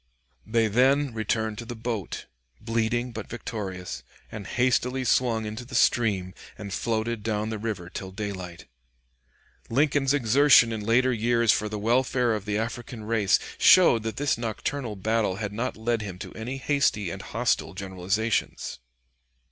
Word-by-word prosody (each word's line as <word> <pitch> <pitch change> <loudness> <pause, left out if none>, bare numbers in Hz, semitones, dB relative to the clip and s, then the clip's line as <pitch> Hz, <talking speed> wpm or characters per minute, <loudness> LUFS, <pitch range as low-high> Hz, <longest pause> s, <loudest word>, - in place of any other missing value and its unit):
They 115 0 +2
then 130 +4 +3
returned 110 0 -1
to 120 - -6
the 120 +1 -6
boat, 115 -4 -4 0.3
bleeding 115 +2 -1
but 110 -2 -7
victorious, 95 - -5 0.3
and 100 -3 -7
hastily 125 +2 +1
swung 115 -3 +2
into 110 +3 -5
the 125 +1 -9
stream 100 -6 +2 0.2
and 100 -2 -6
floated 115 0 -1
down 110 0 -2
the 110 - -4
river 105 -5 -4
till 95 +1 -6
daylight. 95 -3 -6 1.0
Lincoln's 140 +1 +2
exertion 135 -2 +5
in 110 - -4
later 125 +4 +3
years 115 0 +3
for 105 +1 0
the 105 - -4
welfare 120 +2 +2
of 105 -2 -3
the 105 0 -1
African 115 +1 -5
race 105 -3 +3 0.2
showed 170 -11 +7
that 110 0 -4
this 145 -4 0
nocturnal 115 +1 -3
battle 105 0 0
had 100 0 -4
not 115 +3 -3
led 115 0 -1
him 95 -4 -6
to - - -8
any 120 +4 -5
hasty 135 - +1
and - - -6
hostile - - -1
generalizations. 100 - -2
110 Hz, 150 wpm, -26 LUFS, 105-120 Hz, 1.0 s, showed